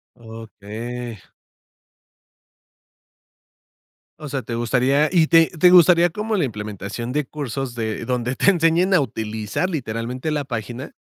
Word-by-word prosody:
Okey. 115 +1 -8 3.0
O 155 -1 -8
sea, 135 -1 -3
¿te 115 +1 -6
gustaría? 130 +5 +2
¿Y 170 -4 +4
te 165 0 +5
te 175 +2 +3
gustaría 175 -1 +6
como 210 +4 -2
la 180 - +1
implementación 105 +1 -5
de 150 0 0
cursos 135 -3 -5
de 110 -2 -3
donde 125 0 -2
te - - +4
enseñen 170 +1 +2
a 180 - +5
utilizar, 110 - -3
literalmente, 125 -1 -4
la 150 -2 -1
página? 120 +1 -6
130 Hz, 125 wpm, -21 LUFS, 115-160 Hz, 3.0 s, gustaría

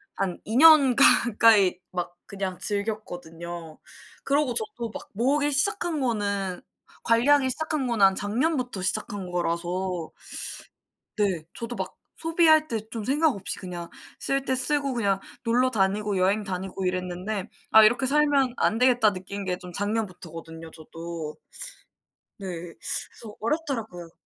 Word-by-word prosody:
한 190 -3 -3
2 220 - -4
년 295 -4 +7
가까이 220 -6 +5
막 175 -1 -4
그냥 195 -2 -5
즐겼거든요. 175 -6 -4 0.5
그러고 280 -2 +1
저도 425 - -2
막 - - -9
모으기 285 +7 +1
시작한 345 +2 +3
거는 200 -7 -2 0.4
관리하기 260 +4 +3
시작한 310 0 -1
거는 230 -4 +1
한 195 0 +4
작년부터 245 - -1
시작한 190 +1 -2
거라서 175 0 -2 1.1
네. 190 -7 0
저도 235 +1 -6
막 190 -2 -5 0.2
소비할 320 -2 +3
때 220 -4 -4
좀 225 -2 -5
생각 295 +5 +2
없이 195 -1 -4
그냥 175 -2 -7 0.3
쓸 275 0 0
때 260 - 0
쓰고 275 +1 +1
그냥 200 -4 0 0.2
놀러 250 +3 +2
다니고 205 -1 0
여행 195 +4 +2
다니고 190 0 -4
이랬는데 185 +3 -3 0.2
'아 220 0 +8
이렇게 240 +5 +3
살면 280 -2 +3
안 220 - +1
되겠다.' 245 -4 +4
느낀 200 +2 -7
게 180 -1 -2
좀 180 -1 -11
작년부터거든요, 175 -6 -5
저도. 165 -1 -8 1.0
네. 195 - -7 0.3
그래서 215 -3 0
어렵더라고요. 225 - -3
210 Hz, 285 characters per minute, -25 LUFS, 185-260 Hz, 1.1 s, 아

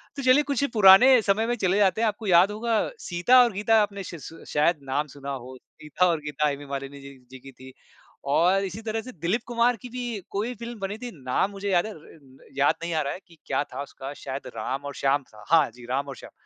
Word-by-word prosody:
तो 280 - -5
चलिए 255 +3 +5
कुछ 280 -2 -1
पुराने 220 +5 +8
समय 210 +2 +1
में 240 - 0
चले 190 -4 +1
जाते 205 +1 +2
हैं 230 - +3
आपको 215 +1 -4
याद 180 +2 +5
होगा 220 +1 0 0.2
सीता 175 +9 +4
और 240 - +1
गीता 215 +3 +3
आपने 200 -1 -3
श 175 - -8
श 165 +1 -11
शायद 150 +2 +2
नाम 140 +3 -2
सुना 140 0 -8
हो, 130 -1 -7
सीता 155 +6 -2
और 165 -3 +1
गीता 150 0 -1
हेमा 145 0 -4
मालिनी 140 0 -6
जी 140 0 -12
जी 130 - -10
की 135 +2 -13
थी 130 0 -14 0.6
और 180 +7 +3
इसी 190 +4 -6
तरह 225 0 -3
से 255 +3 -10
दिलीप 175 +8 -1
कुमार 240 +1 +2
की 250 - -9
भी 240 -4 -5
कोई 220 +5 -2
फ़िल्म 235 0 -8
बनी 195 +2 -4
थी, 245 0 -7
नाम 130 +10 0
मुझे 200 0 -5
याद 175 +2 +3
है 220 - -6
र 155 - -13 0.2
र 130 0 -20
याद 140 - +3
नहीं 170 - -3
आ 160 - +1
रहा 140 -1 -2
है - - -8
कि 165 -2 -19
क्या 135 +1 0
था 135 -1 -8
उसका 135 0 -9
शायद 135 -1 -7
राम 135 +6 -4
और 140 - -5
श्याम 140 +1 +1
था, 105 -3 -17
हाँ 160 -6 +5
जी 120 -1 -13
राम 140 +2 -1
और 135 - -7
श्याम। - - -13
175 Hz, 250 wpm, -25 LUFS, 140-220 Hz, 0.6 s, पुराने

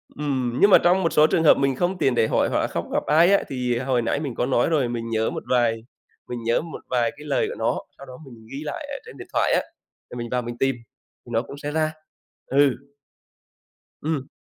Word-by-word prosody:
ừm, 130 -4 -2
nhưng 205 - +7
mà - - +9
trong 180 +2 +3
một 165 - 0
số 150 +1 +6
trường 165 - +1
hợp 155 - +6
mình 135 -1 +1
không 180 +5 -1
tiện 130 -7 +1
để 110 - +3
hỏi - - +1
hoặc - - +1
là - - 0
không - - -4
gặp - - 0
ai 165 +5 +5
á, - - +3
thì 125 -3 -1
hồi 130 -1 0
nãy 115 +5 -1
mình 140 -6 -4
có 120 - 0
nói 130 +2 +2
rồi. 145 -6 +2
Mình 115 -1 -4
nhớ 110 0 0
một - - -5
vài 115 -3 +2 0.5
mình 120 -2 -5
nhớ 115 +4 +1
một 165 0 -8
vài 120 -2 +1
cái 150 - -11
lời 430 - +1
của - - -6
nó, - - 0 0.2
sau 140 - -11
đó 130 - -11
mình 115 -4 -14
ghi 140 +2 -6
lại 295 - -5
ở 280 - -4
trên 465 - -12
điện - - -10
thoại - - +2
á, - - +3 0.5
thì - - -7
mình 120 -1 -5
vào 125 0 0
mình 120 0 -6
tìm 135 0 +1 0.5
thì - - -14
nó 115 0 +1
cũng 140 - -10
sẽ 145 +1 -5
ra. 155 0 0 0.5
Ừ. 140 -1 +3 1.3
Ừm. 150 -3 -2
135 Hz, 250 wpm, -23 LUFS, 120-155 Hz, 1.3 s, mà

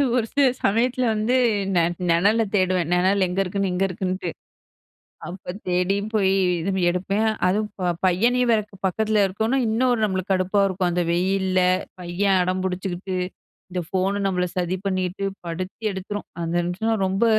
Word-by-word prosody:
ஒரு 240 -3 +2
சில 285 -1 +4 0.2
சமயத்துல 245 +4 +2
வந்து 220 +4 +1 0.4
நெ 175 - +5 0.3
நெணல 205 +7 +3
தேடுவேன். 185 -3 +1
நெணல் 190 +2 +3
எங்க 180 +2 -2
இருக்குன்னு, 195 0 -1
இங்க 180 - 0
இருக்குன்ட்டு. 185 0 -3 1.0
அப்போ 180 +1 -7 0.2
தேடியும் 195 +4 0
போய் 195 -3 +3 0.3
இது 190 - -1 0.2
எடுப்பேன். 195 +5 0 0.2
அதுவும் 210 +4 +1 0.4
பையனையும் 240 +7 +2
வேற 220 - +4 0.3
பக்கத்தில 215 +2 +1
இருக்கோம்னா, 220 +7 0
இன்னும் 240 +1 +1
நம்பளுக்கு 190 -1 -1
கடுப்பா 190 +2 +1
இருக்கும். 185 -2 0
அந்த 175 +1 0
வெயில்ல, 185 +1 +1 0.4
பையன் 185 +2 +1
அடம் 185 +1 -1
பிடிச்சுக்கிட்டு, 185 0 -3 0.5
இந்த 180 0 -2
ஃபோன் 190 +2 0
நம்பள 180 -2 +1
சதி 180 0 0
பண்ணிகிட்டு 185 0 -1 0.2
படுத்தி 185 +6 -6
எடுத்துரும். 200 +2 -5 0.2
அந்த 165 0 -2
நிமிஷன்னா 205 +6 -1
ரொம்ப 195 +4 +1
190 Hz, 140 wpm, -23 LUFS, 180-210 Hz, 1.0 s, நெ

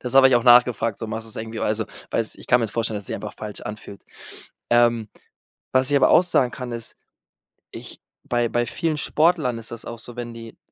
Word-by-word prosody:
das 125 +1 -4
habe 135 -1 +8
ich 130 - +3
auch 120 - 0
nachgefragt. 120 -3 +4
So 115 - -5
machst 110 +1 -5
du's - - -9
irgendwie 110 0 -6
also, 110 +1 0 0.3
weiß - - -1
ich - - -14
kann 120 - +4
mir's 115 - -1
jetzt - - -17
vorstellen, 115 -2 -1
dass 100 - -5
es - - -10
sich - - -3
einfach - - -7
falsch 105 -1 -7
anfühlt. 105 -1 -9 0.7
Ähm, 120 -2 +3 0.7
was 130 +1 +3
ich 140 - +5
aber - - +4
auch 180 - +6
sagen 130 -8 +1
kann, 125 -1 -7
ist, 115 -1 -6 0.8
ich - - -11 0.2
bei 120 -1 0
bei 120 0 0
vielen 160 +5 -2
Sportlern 155 -7 +1
ist 115 - -10
das 115 - -8
auch 115 -1 -7
so, 120 0 -12
wenn 120 -1 -6
die 115 -1 -11
120 Hz, 230 wpm, -23 LUFS, 110-125 Hz, 0.8 s, habe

